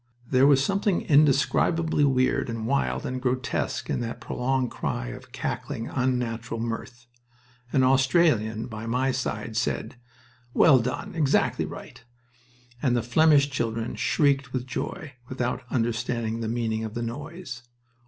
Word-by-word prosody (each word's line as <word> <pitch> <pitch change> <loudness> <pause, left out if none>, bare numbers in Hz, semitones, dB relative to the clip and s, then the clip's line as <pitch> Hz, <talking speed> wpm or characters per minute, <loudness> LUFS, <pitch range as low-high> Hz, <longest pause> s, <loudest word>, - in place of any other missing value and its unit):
There 130 +2 +4
was 140 -1 +5
something 200 -1 +1
indescribably 150 +2 +3
weird 130 -3 +2
and 115 -1 -4
wild 140 +4 0
and 130 0 -3
grotesque 130 0 -1
in - - -1
that 120 -1 -4
prolonged 130 0 -1
cry - - -3
of - - -10
cackling, 115 - -4
unnatural 120 -3 -1
mirth. 120 +1 -5 0.7
An 130 - +3
Australian 130 -5 +3
by 110 -1 -7
my 130 +3 +1
side 115 -4 -3
said: 120 +1 -2 0.6
"Well 140 -5 +7
done! 125 +2 -3
Exactly 150 -5 +1
right!" - - -10 0.8
and 125 -4 +2
the 120 - 0
Flemish 145 +3 +4
children 115 -3 -2
shrieked 140 -4 +1
with 125 -1 -2
joy, 145 +4 -5 0.2
without 125 -1 -2
understanding 115 -1 -1
the 115 - -3
meaning 110 -1 -1
of 110 +1 -6
the 120 - -2
noise. 145 +2 -6
125 Hz, 135 wpm, -26 LUFS, 115-140 Hz, 0.8 s, Well